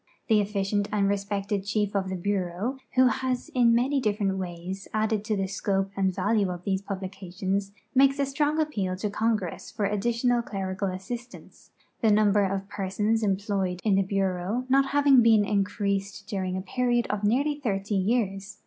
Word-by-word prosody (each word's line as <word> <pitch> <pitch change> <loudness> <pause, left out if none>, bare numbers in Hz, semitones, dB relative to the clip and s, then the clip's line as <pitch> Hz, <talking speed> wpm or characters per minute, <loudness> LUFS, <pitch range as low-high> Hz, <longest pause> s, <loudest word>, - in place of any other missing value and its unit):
The 220 -1 +5
efficient 205 0 -1
and 205 -2 +2
respected 200 0 -1
Chief 205 0 -1
of 190 -1 0
the 190 - -2
Bureau, 195 +6 -2 0.2
who 260 0 +6
has 255 0 0
in 245 -2 +3
so 230 - +5
many 265 +4 +2
different 205 -4 0
ways 180 +1 -6
added 215 -1 +1
to 215 -1 0
the 195 - 0
scope 195 0 -1
and 190 -1 +1
value 205 +1 +1
of 180 -1 -5
these 190 0 -1
publications, 195 0 -4 0.2
makes 275 +1 +5
a 280 - +1
strong 295 +3 0
appeal 205 -13 -1
to 200 +2 -3
Congress 215 -5 -1
for 210 -2 -1
addi 210 +3 0
tional 240 0 +1
clerical 195 -2 -3
assistance, 230 +7 -8 0.3
the 225 - +4
number 205 -1 +4
of 195 0 -2
persons 210 +3 -1
employed 195 -3 -1
in 210 - +2
the 195 - +4
Bureau 195 +4 -1
not 270 +1 +4
luiving 280 -2 +5
been 220 -3 +5
increased 200 -1 -1
during 190 -4 -2
a - - -3
period 240 +3 0
of 210 0 -3
nearly 280 +8 +1
thirty 205 -5 -2 0.2
}'ears. 200 -4 -1
205 Hz, 175 wpm, -27 LUFS, 195-230 Hz, 0.3 s, who